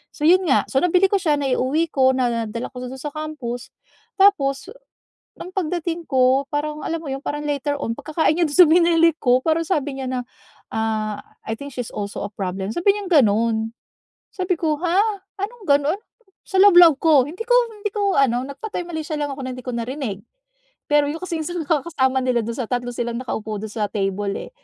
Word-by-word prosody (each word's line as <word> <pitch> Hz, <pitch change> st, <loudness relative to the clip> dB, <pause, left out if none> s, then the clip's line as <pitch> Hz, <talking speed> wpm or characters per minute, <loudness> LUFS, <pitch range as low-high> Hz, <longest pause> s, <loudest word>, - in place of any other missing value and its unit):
So 310 Hz, -, -15 dB
'yon 365 Hz, +3 st, +5 dB
nga. 270 Hz, -, +3 dB
So -, -, 0 dB
nabili 360 Hz, +2 st, +3 dB
ko 405 Hz, -, +4 dB
siya, 310 Hz, -5 st, +2 dB
na-iuwi 275 Hz, +4 st, 0 dB
ko, 260 Hz, -1 st, +4 dB
nadala 235 Hz, -2 st, -2 dB
ko -, -, -10 dB
do'n 250 Hz, -, -7 dB
sa 295 Hz, -, -4 dB
campus, 290 Hz, -6 st, -5 dB, 0.5 s
tapos 280 Hz, -6 st, +3 dB, 0.7 s
ang 360 Hz, -, -7 dB
pagdating 340 Hz, -1 st, -2 dB
ko 260 Hz, +1 st, +3 dB
parang 300 Hz, +1 st, -2 dB
alam 330 Hz, 0 st, -2 dB
mo 295 Hz, -, -6 dB
yun, 270 Hz, -, -3 dB
parang 295 Hz, 0 st, -3 dB
later 290 Hz, 0 st, -1 dB
on, 230 Hz, -, -2 dB
pagkakain 310 Hz, 0 st, 0 dB
niya 345 Hz, -, +3 dB
do'n 290 Hz, -, -3 dB
sa 350 Hz, -, +9 dB
binili 335 Hz, 0 st, +5 dB
ko, 250 Hz, -3 st, +3 dB
parang 325 Hz, +1 st, +1 dB
sabi 290 Hz, -6 st, -1 dB
niya 265 Hz, -, -4 dB
na, 255 Hz, -1 st, -2 dB, 0.5 s
"Ah, 220 Hz, -1 st, -1 dB, 0.3 s
I -, -, 0 dB
think 280 Hz, +1 st, -9 dB
she's 245 Hz, -2 st, -5 dB
also 200 Hz, 0 st, -5 dB
a -, -, -5 dB
problem." 190 Hz, 0 st, -4 dB
sabi 395 Hz, +4 st, +3 dB
niyang 405 Hz, -3 st, -5 dB
gano'n. 220 Hz, +1 st, +1 dB, 0.7 s
Sabi 370 Hz, -1 st, -1 dB
ko, 310 Hz, -2 st, +1 dB
"Huh? 365 Hz, +6 st, +2 dB, 0.3 s
Anong 435 Hz, +2 st, -5 dB
ganon?" 285 Hz, +4 st, +3 dB, 0.5 s
Sa 385 Hz, -, -1 dB
loob-loob 350 Hz, -7 st, +8 dB
ko, 300 Hz, -5 st, +5 dB
hindi 345 Hz, +7 st, -10 dB
ko -, -, +2 dB, 0.2 s
hindi 420 Hz, -1 st, -4 dB
ko 400 Hz, -2 st, +1 dB
ano 250 Hz, -2 st, +2 dB
nagpatay 355 Hz, +7 st, -5 dB
malisya 315 Hz, -2 st, -4 dB
lang 290 Hz, -1 st, -2 dB
ako 275 Hz, -, -8 dB
na 255 Hz, -, -4 dB
hindi 255 Hz, -, -10 dB
ko 250 Hz, -, -4 dB
narinig. 235 Hz, -3 st, -4 dB, 0.7 s
Pero 295 Hz, 0 st, +4 dB
'yong 305 Hz, +3 st, -4 dB
kasing 335 Hz, -3 st, -3 dB
isang 350 Hz, -1 st, -3 dB
nakakasama 285 Hz, -4 st, +1 dB
nila 250 Hz, -2 st, +2 dB
do'n 230 Hz, +1 st, -5 dB
sa 250 Hz, -, -3 dB
tatlo 245 Hz, -1 st, -2 dB
silang 235 Hz, 0 st, -3 dB
nakaupo 220 Hz, -4 st, -4 dB
do'n 220 Hz, -, -5 dB
sa 215 Hz, -1 st, -1 dB
table, 200 Hz, -1 st, -1 dB, 0.2 s
eh. -, -, -24 dB
285 Hz, 195 wpm, -21 LUFS, 245-335 Hz, 0.7 s, sa